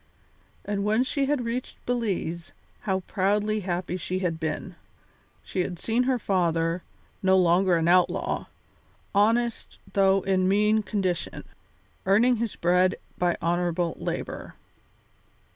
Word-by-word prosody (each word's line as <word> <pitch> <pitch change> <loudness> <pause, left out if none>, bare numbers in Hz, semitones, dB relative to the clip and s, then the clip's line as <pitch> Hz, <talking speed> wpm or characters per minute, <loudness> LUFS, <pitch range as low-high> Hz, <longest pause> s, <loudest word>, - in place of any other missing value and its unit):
And 200 -1 -1
when 215 +4 +2
she 275 +1 -1
had 280 -4 0
reached 240 +2 -4
Belize, 190 -8 -2 0.4
how 190 0 +1
proudly 210 +3 0
happy 180 -1 -3
she 185 +1 -3
had 175 -4 -1
been! 155 -2 -3 0.7
She - - -5
had 180 0 -1
seen 230 +7 0
her 255 - +2
father, 170 -4 0 0.4
no 190 0 +4
longer 180 +1 +4
an 165 0 +1
outlaw, 180 0 +2 0.7
honest 230 +3 +1 0.2
though 195 -1 +4
in 190 -1 +2
mean 210 +2 +3
condition, 190 -4 -2 0.6
earning 230 +6 +4
his 230 -1 -2
bread 180 +2 +3 0.2
by 175 -1 +1
honourable 175 0 0
labour. - - -5
190 Hz, 125 wpm, -26 LUFS, 175-215 Hz, 0.7 s, no